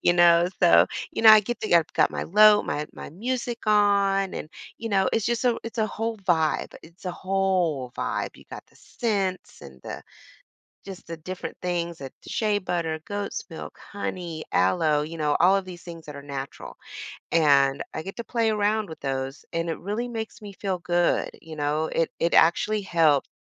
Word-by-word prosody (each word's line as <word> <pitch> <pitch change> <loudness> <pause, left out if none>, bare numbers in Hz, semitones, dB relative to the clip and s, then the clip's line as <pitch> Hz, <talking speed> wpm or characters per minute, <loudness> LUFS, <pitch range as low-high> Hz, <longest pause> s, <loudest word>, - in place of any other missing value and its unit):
You 175 - +3
know, 175 0 +5
so 85 +1 +7 0.3
you - - -3
know, 225 - +7
I 215 0 +9
get 240 +4 -5
that 215 - -3
yeah, 170 -1 +6
got - - +3
my - - -3
low 210 +3 +6
my 150 +1 -3
my - - -9
music 240 +5 -3
on, 200 -2 +3
and, 155 - -6 0.3
you 230 - -4
know, 195 -2 +2
it's 225 - +1
just 235 0 0
so 245 -2 +2
it's 230 +2 -8
a 215 - +2
whole 225 +1 -3
vibe 170 -5 0
it's 170 +4 -17
a 180 - -3
whole 185 -9 0
vibe. - - -2
You've - - -18
got - - -9
the - - -25
scents 200 -6 -3
and 65 -1 -12
the - - -7 0.8
just 195 -2 -10
the 165 -1 -7
different 185 +3 -7
things 170 -2 -2
that 135 -1 -7
the - - -11
shea 215 -6 +1
butter, 170 -4 -2
goat's 205 0 -4
milk, 160 - -8 0.2
honey, 175 -5 -5
aloe, 150 - +2
you 160 +2 -7
know, 150 -1 +1
all 185 +3 +5
of 195 -1 0
these 175 -2 -9
things 165 -2 -10
that 150 -1 -8
are 140 - -8
natural. 140 -1 -7 0.6
And 140 -4 +4
I 155 - -4
get 195 - -7
to 235 - -4
play 230 -1 0
around 210 -1 0
with 160 - -9
those, 135 0 -4
and 165 0 -1
it 160 - -5
really 210 +6 -3
makes 225 -2 -6
me 205 -2 -10
feel 190 -1 -3
good, 175 0 +1
you 160 -1 -10
know? 150 +1 0
It 165 - -1
it 170 - +1
actually 210 +6 +4
helped. 160 -6 +3
180 Hz, 200 wpm, -25 LUFS, 160-205 Hz, 0.8 s, I